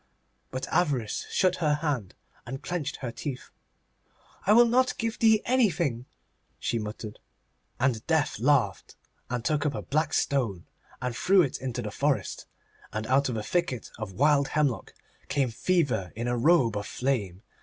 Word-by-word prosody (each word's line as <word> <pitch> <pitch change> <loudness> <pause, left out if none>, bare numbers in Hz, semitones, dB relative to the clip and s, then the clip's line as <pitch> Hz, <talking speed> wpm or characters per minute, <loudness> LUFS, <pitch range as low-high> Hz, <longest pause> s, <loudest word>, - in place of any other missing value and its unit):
But 130 0 -4
Avarice 140 -11 0
shut 185 -1 +2
her 150 -3 +2
hand, 145 - -2 0.3
and 135 +2 -6
clenched 175 -5 -3
her 125 -3 -5
teeth. 130 +1 -6 1.0
'I 210 - +7
will 240 +2 +8
not 255 +2 +2
give 225 0 -2
thee 220 -1 +5
anything,' 170 - +1 0.5
she 115 - -1
muttered. 105 0 -6 0.6
And 120 -4 +1
Death 160 -9 +1
laughed, 120 -7 +1 0.3
and 120 -1 -3
took 150 -2 +1
up 145 -2 0
a - - -4
black 155 +1 0
stone, 115 -11 0 0.4
and 125 -2 -2
threw 190 +8 +4
it 135 - -3
into 125 -2 -3
the 105 - -4
forest, 140 +4 -1 0.4
and 110 0 -3
out 135 +3 +2
of 120 - -2
a 105 - -3
thicket 150 -4 -1
of 105 -3 -5
wild 140 +4 +3
hemlock 135 -9 0 0.3
came 135 -4 0
Fever 135 - 0
in 120 +2 -3
a 120 - +1
robe 125 -3 +4
of 105 - -4
flame. 110 -8 -2
135 Hz, 160 wpm, -27 LUFS, 115-160 Hz, 1.0 s, will